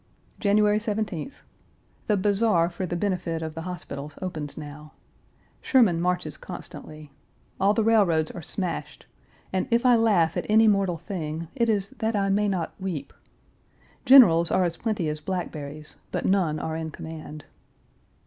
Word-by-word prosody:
January 210 0 +3
17th. 210 - -4 0.6
The 210 -3 +2
Bazaar 200 -3 +2
for 180 +2 -4
the 175 - -3
benefit 175 -3 -2
of 160 -1 -5
the 165 - -6
hospitals 150 -4 -7
opens 155 -6 -5
now. 150 0 -9 0.7
Sherman 215 -11 +3
marches 180 0 -1
constantly. 155 -2 -10 0.5
All 200 +2 +3
the 225 - +2
railroads 195 -8 +3
are 175 - -8
smashed, 180 +3 -2 0.5
and 185 - 0
if 235 +2 +2
I 250 -1 +6
laugh 205 -8 +3
at - - -3
any 220 +1 +6
mortal 195 -4 +2
thing 160 -4 -5
it 235 -3 +1
is 200 -2 0
that 220 -1 0
I 195 -1 +1
may 205 +2 +2
not 185 -5 -2
weep. 185 -6 -5 0.9
Generals 210 -12 +7
are 185 - +2
as 170 -1 -1
plenty 210 -7 -2
as 150 0 -3
blackberries, 155 -4 -5
but - - -2
none 185 -6 +2
are 160 +1 -3
in 160 0 -4
command. 155 -1 -9
180 Hz, 150 wpm, -25 LUFS, 160-210 Hz, 0.9 s, Generals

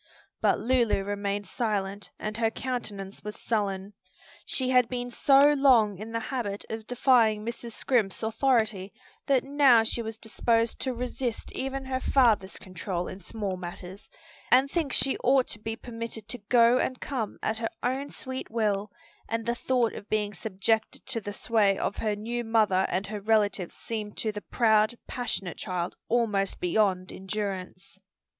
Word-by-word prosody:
But - - +3
Lulu 235 -5 +2
remained 205 0 -2
silent, 200 -2 -2
and 215 0 -4
her 225 0 +2
countenance 215 -6 -4
was 210 0 -6
sullen. 200 -3 -2 0.5
She 260 - +1
had 250 -2 +4
been 245 -1 -3
so 280 +3 +5
long 240 -9 +4
in 220 +2 -7
the 230 - -1
habit 230 -6 -4
of 220 -1 -5
defying 235 -4 +3
Mrs. 235 0 -5
Scrimp's 225 -6 0
authority 220 -4 +1 0.4
that 270 -3 +3
now 275 -5 +5
she 230 +1 0
was 220 -1 -5
disposed 230 0 0
to 260 -2 0
resist 245 -1 -3
even 270 0 -3
her 260 0 -1
father's 225 -8 +3
control 180 -1 -4
in 185 - -7
small 200 0 -4
matters, 180 +2 -8 0.4
and 270 +2 +5
think 320 -6 0
she 270 - +2
ought 260 0 +4
to 210 - -2
be 225 +1 -4
permitted 230 -2 -6
to 245 - -2
go 240 0 +6
and 255 - -1
come 240 -7 -3
at 220 - 0
her 225 - -1
own 265 +3 -1
sweet 260 0 -6
will, 210 -3 0 0.4
and 225 0 -2
the 235 - +1
thought 240 -1 +1
of 205 - -9
being 210 -1 0
subjected 220 +6 -1
to 250 -4 -2
the 205 - -5
sway 205 -2 +2
of 200 - -2
her 215 -2 0
new 235 +3 -3
mother 215 -5 +3
and 185 +3 -1
her 210 0 -5
relatives 205 -4 +1
seemed 215 -2 -5
to 220 - 0
the 210 0 -6
proud, 220 0 +2
passionate 220 -8 -3
child 180 -3 -3
almost 210 -5 +1
beyond 185 0 +1
endurance. 190 -1 -5
220 Hz, 165 wpm, -28 LUFS, 200-245 Hz, 0.5 s, go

